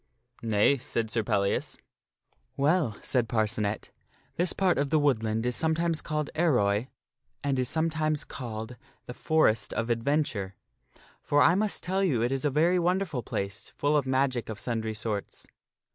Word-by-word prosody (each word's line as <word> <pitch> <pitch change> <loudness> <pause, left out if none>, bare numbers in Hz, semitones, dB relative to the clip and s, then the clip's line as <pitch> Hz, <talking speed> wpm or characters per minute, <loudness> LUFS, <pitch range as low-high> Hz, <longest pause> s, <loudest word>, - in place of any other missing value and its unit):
" 120 - -48
" - - -27
Nay," 115 +4 +3
said 115 -2 -3
Sir 115 - +1
Pellias. 100 -1 0 0.4
" - - -43
Well," 145 - +2
said 125 -3 0
Par 110 -2 +2
sirpdKas 105 - -2
and 105 - +1
cenet, 105 - -5 0.2
" - - -35
this 175 +2 +2
part 185 -5 +1
of 140 0 0
the 155 - +3
woodland 115 -6 +1
is 125 0 0
sometimes 165 0 0
called 150 -1 -3
Ar 170 - +2
parccnet - - +4
come 150 - +4
roy, 105 +2 +1 0.6
and 140 -2 0
is 125 -1 +1
sometimes 155 -2 0
called 115 -2 -7 0.3
the 125 - -7
Forest 120 -8 +1
of 115 +1 -1
Adventure. 115 -6 -1 0.7
For 145 0 +2
5J - - +7
* - - +6
I - - +4
must 205 +2 -1
tell 190 +2 0
you 130 -12 +1
it 120 - 0
is 135 -1 -1
a - - +4
very 165 +6 +3
wonderful 175 -5 0
place, 100 -3 -4
full 145 +1 +1
of 145 -3 +1
magic 130 -3 0
of 110 -2 -5
sundry 110 -2 -3
sorts. 105 -2 -4
130 Hz, 200 wpm, -28 LUFS, 110-155 Hz, 0.7 s, 5J